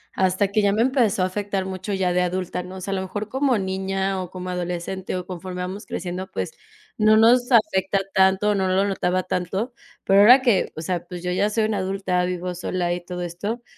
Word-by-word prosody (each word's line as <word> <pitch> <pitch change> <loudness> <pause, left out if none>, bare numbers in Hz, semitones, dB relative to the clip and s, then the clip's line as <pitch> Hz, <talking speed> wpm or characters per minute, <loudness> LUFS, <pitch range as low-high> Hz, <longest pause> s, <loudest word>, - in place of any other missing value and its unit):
hasta 190 +1 +2
que 215 +1 +2
ya 200 -1 +3
me 225 +2 +3
empezó 240 -8 +2
a - - +3
afectar 195 0 -2
mucho 190 +2 -5
ya 185 -2 +1
de 180 - +2
adulta, 180 0 -2
¿no? 180 +1 -9
O 185 - -8
sea, 195 - -4
a - - 0
lo 190 - -1
mejor 205 +3 -5
como 265 -3 +1
niña 190 0 -2
o 180 - -6
como 185 0 -7
adolescente 180 +1 -4
o 180 -1 -4
conforme 180 0 -6
vamos 190 +4 -6
creciendo, 180 +1 -5
pues, 95 - -3 0.5
no 215 0 +5
nos 245 +3 +5
afecta 195 -4 +3
tanto, 190 +2 +3
no 190 -1 0
lo 190 +2 +2
notaba 185 -2 0
tanto. 190 +7 -2 0.3
Pero, 195 +1 +4
ahora 250 +5 +8
que 230 -7 +2
o 160 - -5
sea, 175 0 -2
pues 180 -1 -8
yo 180 - -1
ya 205 +3 +1
soy 220 +1 0
una 215 -2 -1
adulta, 185 -1 -1
vivo 180 0 -3
sola 175 0 -2
y 175 - -4
todo 180 0 -6
esto. 205 +8 -4
190 Hz, 220 wpm, -23 LUFS, 180-205 Hz, 0.5 s, ahora